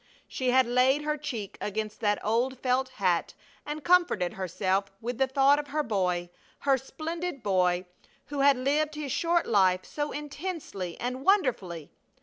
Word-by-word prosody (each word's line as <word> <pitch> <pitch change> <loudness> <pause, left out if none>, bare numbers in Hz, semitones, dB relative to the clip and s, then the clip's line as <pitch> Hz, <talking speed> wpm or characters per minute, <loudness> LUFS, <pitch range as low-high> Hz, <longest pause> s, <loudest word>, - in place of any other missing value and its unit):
She 255 -1 -2
had 260 +1 +5
laid 255 +4 +3
her 300 0 0
cheek 240 -9 -6
against 215 +1 -3
that 205 -2 +2
old 240 +5 +1
felt 255 +1 0
hat 185 -8 0 0.3
and 295 0 -4
comforted 345 - +3
herself 190 +1 -1
with 240 +2 -4
the 265 - +3
thought 275 +2 +4
of 295 - -5
her 300 +1 -1
boy, 180 -6 -1 0.3
her 275 -1 +4
splendid 315 +2 -5
boy, 180 -2 +2 0.4
who 285 +2 -5
had 275 -1 +5
lived 295 +4 0
his 295 -3 -4
short 340 +4 +1
life 185 -3 +3
so 295 0 -3
intensely 295 - -5
and 255 +2 -3
wonderfully. 230 - +1
255 Hz, 155 wpm, -28 LUFS, 200-295 Hz, 0.4 s, had